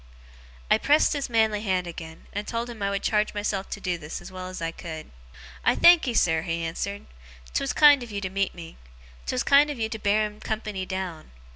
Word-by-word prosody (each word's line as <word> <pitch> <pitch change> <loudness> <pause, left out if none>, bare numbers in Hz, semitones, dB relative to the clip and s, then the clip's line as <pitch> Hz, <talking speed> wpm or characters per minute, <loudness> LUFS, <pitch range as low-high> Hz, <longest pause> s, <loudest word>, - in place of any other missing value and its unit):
I - - +5
pressed 300 +2 +4
his 285 -3 -3
manly 220 -3 +2
hand 185 -4 0
again, 165 -1 -9
and 205 +1 -4
told 235 +1 -3
him 225 -3 -11
I 200 - +1
would 200 0 -2
charge 210 -1 +1
myself 205 -1 -2
to - - -5
do 180 -2 -2
this 150 -1 -6
as - - -11
well 185 0 -7
as 185 0 -7
I 165 0 -2
could. 160 -2 -8 0.5
'I - - +3
thankee, 330 -8 +6
sir,' 165 -5 +3
he 165 0 -3
answered. 200 +5 -4 0.5
''Twas 275 - 0
kind 290 -3 +7
of 240 - -7
you 205 -1 -4
to 190 - -3
meet 195 0 -1
me. 165 -2 -10 0.5
'Twas 125 - 0
kind 285 +2 +5
of 290 - -4
you 220 -1 -1
to 220 - -5
bear 210 +1 +2
him 210 0 -8
company 215 -4 -4
down. 185 -4 -5
200 Hz, 220 wpm, -26 LUFS, 180-225 Hz, 0.5 s, kind